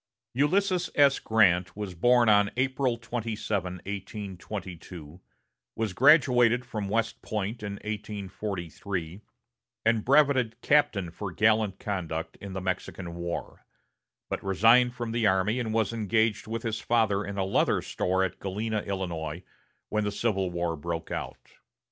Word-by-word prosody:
Ulysses 180 - +2
S. 140 -1 +5
Grant 95 -4 +3
was 105 -3 -4
born 120 +7 +4
on 105 -1 +5
April 130 -1 +1
27, 110 -5 -3
1822, 95 -4 -7 0.5
was 110 -4 -2
graduated 125 - +5
from 105 -4 -4
West 115 +2 -1
Point 105 +2 -3
in 105 -1 -4
1843, 100 -3 -5 0.6
and 115 -1 +3
brevetted 135 -4 +4
captain 100 - +2
for 95 +2 -6
gallant 110 0 +2
conduct 85 -5 -4
in 100 -1 -8
the 95 - -4
Mexican 90 -1 -4
War; 85 0 -5 0.6
but - - -4
resigned 115 +6 +4
from 120 -2 -4
the 115 -1 +2
army 95 +5 +2
and 115 -3 -2
was 115 +1 +1
engaged 110 0 +1
with 115 0 -4
his 110 -1 -2
father 110 -4 +1
in 100 0 -6
a 95 - 0
leather 95 - +2
store 95 +1 0
at 95 - -3
Galena, 105 +3 -2
Illinois, 90 -4 -4 0.5
when 105 0 0
the 105 - -1
Civil 100 -3 0
War 85 -1 -2
broke 80 +1 -5
out. - - -7
105 Hz, 135 wpm, -28 LUFS, 95-115 Hz, 0.6 s, S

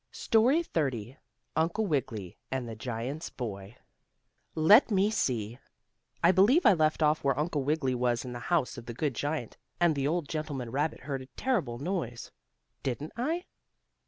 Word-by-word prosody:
STORY 250 +9 +3
XXX 135 - -2 0.4
UNCLE 170 +7 +1
WIGGILY 115 - -2
AND 130 -2 -2
THE 115 - -6
GIANT'S 125 +7 -4
BOY 105 -2 -7 0.8
Let 200 - +7
me 200 0 +3
see, 120 - -1 0.6
I 170 - +7
believe 215 - +4
I 210 - +8
left 155 -2 +2
off 150 +1 +2
where 135 -1 +2
Uncle 150 -2 0
Wiggily 140 -2 0
was 120 -1 0
in 125 - -6
the 120 - -5
house 160 -7 +1
of 120 - -13
the 120 - -6
good 145 +1 -1
giant, 145 0 -3 0.2
and 175 -2 +4
the 140 -1 -1
old 165 -1 -1
gentleman 145 -7 -4
rabbit 150 +4 -1
heard 135 -1 -4
a 130 - -10
terrible 185 - 0
noise. 140 -6 -4 0.5
Didn't 140 +4 -3
I? 320 +10 -1
145 Hz, 160 wpm, -29 LUFS, 125-175 Hz, 0.8 s, I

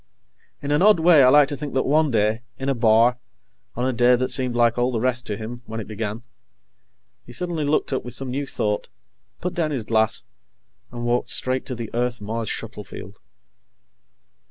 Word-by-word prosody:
In 145 - -2
an 150 - +2
odd 210 -2 +6
way, 160 -2 +6
I 130 - +7
like 145 +1 +6
to 145 - -3
think 140 -1 -6
that 130 - +1
one 155 +2 +3
day, 110 -1 +1 0.2
in 135 +1 -3
a - - +2
bar, 115 +1 +3 0.6
on 125 - -1
a 130 - 0
day 120 +1 +4
that 130 +1 -1
seemed 125 -2 +2
like 120 -1 +3
all 120 +1 +2
the 120 -3 -2
rest 125 +1 -1
to 105 - -3
him 115 +2 -7
when 115 0 -5
it 110 - -5
began, 110 +1 -5 1.0
he - - -13
suddenly 165 +2 -2
looked 145 -1 0
up 130 - -1
with 125 0 -4
some 135 0 -3
new 140 +2 -3
thought, 105 -4 -2 0.5
put 180 - -3
down 165 -3 0
his 135 -6 -2
glass, 110 0 +1 0.7
and 120 0 -5
walked 120 +1 0
straight 130 0 -1
to 125 - -4
the 115 -2 -6
Earth 120 +1 -1
Mars 110 +1 -4
shuttle - - -5
field. - - -11
125 Hz, 205 wpm, -23 LUFS, 115-140 Hz, 1.0 s, I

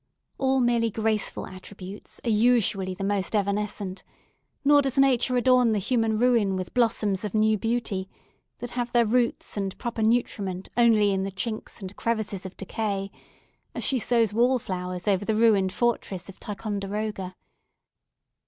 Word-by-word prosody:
All 265 -1 +2
merely 235 -1 +2
graceful 220 -1 -1
attributes 190 +1 -10
are - - +1
usually 210 -4 +2
the 195 - -5
most 200 +1 -1
evanescent; 200 -2 -2 0.6
nor 290 0 +6
does 270 -1 -2
nature 255 -2 +3
adorn 250 -2 +4
the - - +1
human 225 +1 +1
ruin 230 -5 +3
with 185 -1 -5
blossoms 220 -5 +1
of 210 -1 -4
new 215 0 +4
beauty, 215 -3 -2 0.5
that 245 0 -6
have 240 -1 -3
their 240 -1 +4
roots 235 -1 0
and 195 -2 -3
proper 235 -1 -4
nutriment 205 -5 0
only 225 -4 +4
in 190 -1 0
the 195 - -2
chinks 215 +4 -5
and 190 +1 -7
crevices 215 -4 -2
of 185 - -14
decay, 195 -1 -3 0.6
as - - -3
she 265 - +2
sows 230 -3 +2
wall 245 +4 +3
flowers 180 -3 -5
over 195 -1 +2
the 220 +1 0
ruined 210 -4 +4
fortress 200 -5 -1
of 190 - -12
Ticonderoga. 205 -2 -4
215 Hz, 155 wpm, -26 LUFS, 195-235 Hz, 0.6 s, nor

